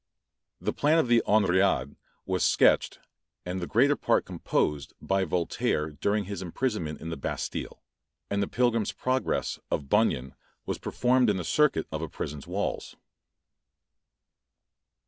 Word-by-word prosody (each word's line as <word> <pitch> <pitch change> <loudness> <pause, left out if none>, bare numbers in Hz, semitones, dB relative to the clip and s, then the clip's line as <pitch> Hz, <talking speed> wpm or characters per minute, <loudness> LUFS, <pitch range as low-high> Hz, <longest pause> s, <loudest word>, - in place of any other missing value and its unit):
The - - -2
plan 150 +3 +3
of 160 - +3
the 120 -1 +4
"Henriade" 95 -9 +2 0.3
was - - 0
sketched, - - +3 0.5
and 90 +1 -3
the 85 - -3
greater 140 +6 +4
part - - +1
composed, 70 -2 -1
by 95 0 0
Voltaire 80 -2 -1
during 100 +8 0
his 100 -1 -6
imprisonment 90 - -2
in 80 - -6
the - - -3
Bastile; 70 - -5 0.4
and 100 0 -1
"the 100 - 0
Pilgrim's 115 -3 +1
Progress" 130 +1 -1
of 70 -2 -2
Bunyan 65 +1 +2 0.3
was - - -3
performed 125 -1 +2
in 100 - +1
the 90 - -3
circuit 150 - +2
of 80 0 -3
a 80 - -4
prison's 70 -1 -6
walls. - - -3
95 Hz, 140 wpm, -28 LUFS, 80-120 Hz, 0.5 s, the